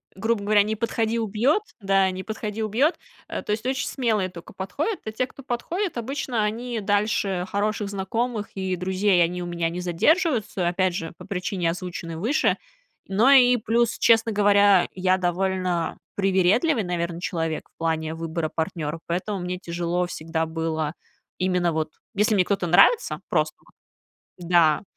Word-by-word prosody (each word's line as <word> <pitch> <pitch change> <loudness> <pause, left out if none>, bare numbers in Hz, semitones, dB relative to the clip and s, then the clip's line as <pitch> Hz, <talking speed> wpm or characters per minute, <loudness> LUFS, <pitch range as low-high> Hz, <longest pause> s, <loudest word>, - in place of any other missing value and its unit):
грубо 215 +2 0
говоря, 205 0 +4
"не 215 +2 -1
подходи-убьет", 230 - +1 0.2
да, 195 -2 +2
"не 185 0 -6
подходи-убьет". 220 - -1 0.3
Э, - - -4
то - - -4
есть, 215 +3 -2
очень 260 0 -1
смелые 220 -8 0
только 175 -2 -12
подходят. 290 - -3
А 220 - -3
те, 255 +4 -1
кто 270 - -14
подходит, 305 +8 -3
обычно 245 -2 -2
они 230 +2 -2
дальше 200 -2 0
хороших 205 0 -1
знакомых 210 +3 -2
и 190 -1 -2
друзей 185 0 +2
они 180 +1 -2
у 175 - -4
меня 170 -1 -1
не 180 +2 -5
задерживаются, 215 - +1
опять 185 0 +1
же, 165 -2 -4
по - - -11
причине, 180 -2 -1
озвученной 175 -2 -6
выше. 235 - +1 0.5
Но 215 +8 +4
и 250 -2 +7
плюс, 230 +1 +1
честно 225 0 +4
говоря, 200 -2 +5
я 185 0 +2
довольно 180 -1 -1 0.2
привередливый, 195 - +2
наверно, 170 -1 -3
человек 165 -3 -3
в - - -76
плане 160 -1 -1
выбора 165 -1 -3
партнера, 160 -2 -3
поэтому 185 +4 -2
мне 180 0 -3
тяжело 175 0 -2
всегда 165 -1 -3
было 160 -1 -2 0.5
именно 180 -2 +1
вот, 155 -1 -1 0.2
если 210 +1 +2
мне 180 -2 +3
кто-то 195 -3 0
нравится 305 - +4
просто - - +1
вот, - - -23 0.8
да, 165 -2 +4
195 Hz, 155 wpm, -24 LUFS, 175-220 Hz, 0.8 s, и